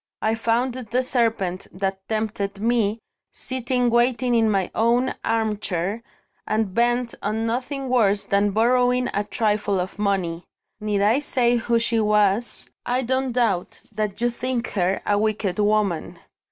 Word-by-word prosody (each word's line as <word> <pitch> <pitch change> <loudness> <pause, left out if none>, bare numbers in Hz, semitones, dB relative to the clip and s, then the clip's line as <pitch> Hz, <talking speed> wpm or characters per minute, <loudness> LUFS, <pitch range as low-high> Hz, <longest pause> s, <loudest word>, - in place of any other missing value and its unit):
I 220 - +2
found 230 +3 0
the 250 0 -2
serpent 225 -8 0
that 190 +1 -2
tempted 210 -2 -2
Me, 225 -1 +1 0.3
sitting 250 -1 -1
waiting 245 +1 +2
in 225 -2 +3
my 195 -3 0
own 240 +3 +2
armchair, 210 -3 -1 0.5
and 215 -3 0
bent 240 +2 +1
on 220 +2 -1
nothing 260 +4 -2
worse 210 -5 +2
than 200 +1 +2
borrowing 245 +3 +2
a 205 - 0
trifle 210 -2 0
of 180 +2 -5
money. 185 -5 -1 0.4
Need 210 -2 0
I 220 +6 +4
say 245 -4 +2
who 235 0 +1
she 230 0 +1
was? 210 +1 +1
I 250 +2 0
don't 260 +1 0
doubt 225 -7 -1
that 210 -2 -3
you 240 0 +2
think 250 0 -3
her 190 -1 0
a 205 0 +2
wicked 215 -3 -1
woman." 205 -5 +1
220 Hz, 145 wpm, -23 LUFS, 205-240 Hz, 0.5 s, I